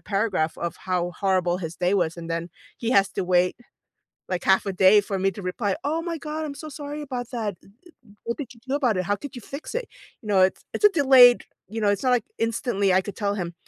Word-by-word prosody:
paragraph 195 -6 -1
of 170 - -3
how 180 -1 -2
horrible 185 -2 +1
his 165 -2 -6
day 180 +2 +1
was, 175 -3 0
and 165 0 -8
then 165 +1 -3 0.3
he 235 0 -2
has 200 -4 +4
to 195 - -3
wait, 180 0 +2 0.7
like, 180 -1 -3
half 190 +1 +3
a 195 - -2
day 190 +3 +6
for 195 -2 -3
me 195 +1 +2
to 200 - -9
reply, 190 +2 -2
"Oh 315 +3 0
my 335 0 -3
god, 310 +1 -5
I'm 280 - -6
so 310 +1 -8
sorry 295 +1 -6
about 250 -4 -5
that, 215 -6 -3
eh - - -21
eh 200 +5 -23 0.5
what 235 - -3
did 265 -4 -6
you - - -18
do 270 - -2
about 245 -9 +1
it? 185 - 0
How 205 +3 0
could 285 +3 -9
you 245 - -7
fix 280 +3 -8
it?" - - -2 0.4
You - - -10
know, 195 -2 +3
it's 185 - +1
it's 420 - +2
a - - +9
delayed, 265 -7 +7 0.2
you 220 +2 -5
know, 205 - +3
it's 205 - 0
not 255 - +1
like 245 -3 +2
instantly 225 -3 0
I 185 +1 +4
could 195 +1 -8
tell 205 -1 -1
him, 175 -3 -4
205 Hz, 255 wpm, -24 LUFS, 185-250 Hz, 0.7 s, a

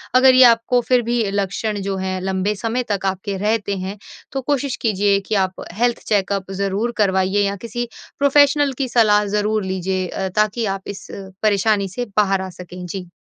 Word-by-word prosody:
अगर 260 0 +7
ये 255 - +8
आपको 235 +1 +4
फिर 250 -1 +4
भी 235 +1 0
लक्षण 200 +2 -2
जो 195 0 -2
हैं 185 0 -2
लंबे 190 +2 -1
समय 230 +4 -2
तक 195 -1 -1
आपके 195 +1 -2
रहते 205 0 -1
हैं 190 +2 -5 0.3
तो 270 - -3
कोशिश 280 0 -1
कीजिए 205 -2 +2
कि 215 - 0
आप 185 0 -9
हेल्थ 235 +4 +1
चेकअप 195 -2 0
ज़रूर 200 +4 0
करवाइएँ 190 0 +2
या 200 0 -1
किसी 240 +1 -3 0.3
प्रोफेशनल 285 0 +4
की 270 - -1
सलाह 210 -3 +4
ज़रूर 210 0 0
लीजिए 185 0 -2
अ, 190 +2 -3
ताकि 215 +4 0
आप 195 - -8
इस 200 - -7 0.4
परेशानी 205 -1 +2
से 245 +7 -4
बाहर 195 -2 +3
आ 190 - -5
सकें। 180 0 -9
जी। 180 +1 -6
205 Hz, 180 wpm, -20 LUFS, 190-235 Hz, 0.4 s, ये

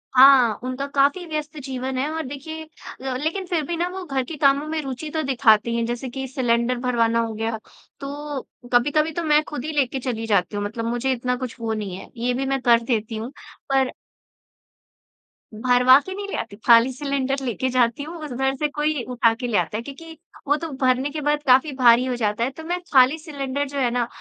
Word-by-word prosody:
हाँ, 255 -4 +7
उनका 255 +2 -3
काफ़ी 280 +5 +1
व्यस्त 305 0 -4
जीवन 260 -1 -4
है, 280 +4 0
और 320 0 -3
देखिए 295 +4 -7 0.4
अ, 265 -1 -3
लेकिन 325 +8 -2
फिर 345 -3 -1
भी 345 - -3
ना 345 +1 0
वो 375 +1 -6
घर 270 -3 -1
के 315 +6 -7
कामों 280 0 +3
में 315 0 -2
रूचि 270 +2 -6
तो 315 +1 -2
दिखाती 235 -4 +3
हैं, 235 0 0
जैसे 240 +2 -4
कि 265 +2 -5
सिलेंडर 245 -1 0
भरवाना 230 -2 +1
हो 230 -1 -1
गया। 225 +1 -2 0.4
तो 285 0 -5 0.3
कभी-कभी 295 +6 +3
तो 335 +2 -3
मैं 300 -1 +4
खुद 295 -3 -6
ही 315 - -3
लेके 270 -2 0
चली 240 -3 -3
जाती 200 -3 +1
हूँ 205 - -2
मतलब 225 +2 -4
मुझे 240 +3 -1
इतना 250 0 -1
कुछ 250 -1 -6
वो 225 -1 -2
नहीं 205 -4 -4
है। - - -11
ये 245 +2 0
भी 265 +2 -2
मैं 270 0 -1
कर 235 -1 +5
देती 225 -2 -1
हूँ, 225 +4 -5 0.4
पर 270 -1 +2 1.6
भरवा 250 +3 +5
के 380 - -5
नहीं 400 +1 -5
ले - - -4
आती, 200 - -5
खाली 235 +2 +6
सिलेंडर 275 0 -2
लेके 250 +1 -1
जाती 245 +1 +1
हूँ 330 +3 -8
उधर 265 0 -1
से 300 +3 0
कोई 295 -2 -1
उठा 240 -2 +3
के 245 +1 -4
ले 225 -4 +1
आता 180 +4 -1
है, - - -3
क्योंकि 320 +5 -10 0.3
वो 290 - +4
तो 330 +2 -5
भरने 260 +2 +2
के 305 +1 -5
बाद 295 0 0
काफ़ी 265 +4 +5
भारी 245 -1 +5
हो 255 -1 -1
जाता 215 -1 -1
है। 245 - +1
तो 320 - -8
मैं 350 +2 -2
खाली 260 +3 +6
सिलेंडर 285 -3 -3
जो 280 +1 -7
है 250 -3 +2
ना, 240 -1 0
260 Hz, 220 wpm, -23 LUFS, 240-295 Hz, 1.6 s, हाँ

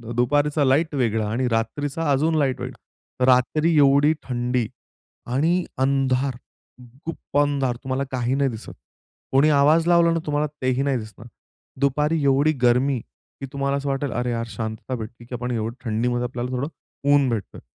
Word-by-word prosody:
दुपारीचा 145 +4 +2
light 145 +4 +2
वेगळा 110 -5 0
आणि 125 +3 0
रात्रीचा 145 +7 -1
अजून 155 +4 +2
लाईट 135 -4 0
वेगळा. 125 - -6
रात्री 155 +6 +2
एवढी 140 +1 +5
थंडी 125 -2 -1 0.7
आणि 165 +7 +2
अंधार, 135 0 +1 0.7
गुप्प 165 -3 -5
अंधार. 140 -4 +1
तुम्हाला 135 0 -1
काही 125 0 0
नाही 140 -1 +2
दिसत. 115 -2 -8 0.6
कोणी 140 +3 +4
आवाज 150 +3 +4
लावला 170 -1 +5
ना 165 - +1
तुम्हाला 150 0 0
तेही 130 0 +1
नाही 140 -2 +1
दिसणार. 110 +1 -10 0.5
दुपारी 150 +3 +1
एवढी 140 +2 +3
गरमी 125 +2 +3
की 65 - -13
तुम्हाला 140 0 0
असं 140 0 -3
वाटेल 135 0 -1
"अरे 125 0 -1
यार! 115 -1 -2
शांतता 110 +3 -5
भेटते 115 +1 -8
की 125 - -6
आपण 125 +1 -4
एवढी 115 0 -2
थंडीमध्ये 120 +2 0
आपल्याला 125 0 -4
थोडं 130 +2 -2 0.5
ऊन 140 -2 +4
भेटतोय." 110 -5 -4
135 Hz, 155 wpm, -23 LUFS, 120-145 Hz, 0.7 s, एवढी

